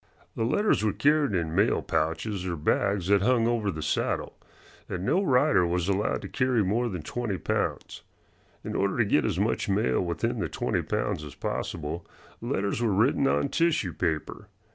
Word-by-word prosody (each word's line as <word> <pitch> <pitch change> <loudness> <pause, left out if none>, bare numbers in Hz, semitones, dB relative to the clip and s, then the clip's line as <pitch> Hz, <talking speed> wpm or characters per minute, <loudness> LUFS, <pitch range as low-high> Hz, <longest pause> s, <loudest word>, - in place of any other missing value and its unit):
The 115 - 0
letters 205 - +2
were 105 - +1
carried 150 -5 +2
in 80 -3 -1
mail 105 +6 +2
pouches 85 +5 -1
or 85 - -2
bags 95 +4 0
that 100 -1 +4
hung 120 +1 +3
over 115 -4 0
the 80 -4 -4
saddle, 75 - -1 0.5
and 90 +1 -3
no 185 - +2
rider 140 - +3
was 90 0 -1
allowed 100 +1 0
to - - -5
carry 125 -4 +1
more 115 +6 0
than 90 -6 -5
twenty 110 +2 -3
pounds. - - -2 0.6
In - - -5
order - - 0
to - - +3
get - - +2
as - - -1
much - - 0
mail 65 - +1
within 85 -1 -2
the - - -2
twenty - - -1
pounds 75 - -2
as 75 - -9
possible 80 +1 -4 0.4
letters 100 +4 -1
were 115 -3 +2
written 125 +7 +3
on 140 - +1
tissue 155 - +1
paper. 80 -3 -3
100 Hz, 180 wpm, -27 LUFS, 85-120 Hz, 0.6 s, that